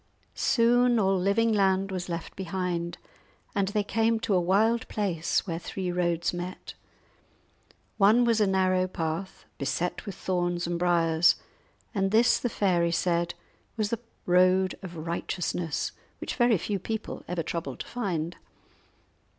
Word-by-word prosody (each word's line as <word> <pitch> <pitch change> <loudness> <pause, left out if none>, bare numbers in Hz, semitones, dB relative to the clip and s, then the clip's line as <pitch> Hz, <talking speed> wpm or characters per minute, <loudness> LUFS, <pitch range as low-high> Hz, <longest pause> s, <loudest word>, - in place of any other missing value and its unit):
Soon 240 0 +3
all 195 -2 +3
living 200 +5 +2
land 195 -1 +2
was 180 -1 -4
left 170 -1 -5
behind, 180 -2 -3 0.6
and 200 -1 +1
they 205 +1 0
came 225 +2 +1
to 215 - 0
a 180 - +4
wild 215 +6 +2
place 180 -6 -1
where 165 -3 -3
three 180 +1 -4
roads 175 -1 0
met. 175 +1 -6 1.2
One 215 +4 +5
was 230 -2 +3
a 210 - +4
narrow 185 -1 +2
path, 165 +1 -4
beset 140 - -2
with 200 - -5
thorns 175 -1 -1
and 170 0 -2
briers; 170 -2 +4 0.6
and 195 -3 +1
this 225 +4 +4
the 245 - -1
fairy 175 -6 +1
said 170 0 0 0.4
was 215 -2 0
the 230 - -1 0.3
road 185 +1 +4
of 175 -3 -8
righteousness, 170 -1 -2 0.3
which - - -4
very 240 -3 +3
few 200 +3 -2
people 220 +3 -5
ever 175 -1 -2
troubled 145 -7 -4
to - - -7
find. 180 -8 -3
185 Hz, 140 wpm, -27 LUFS, 175-205 Hz, 1.2 s, One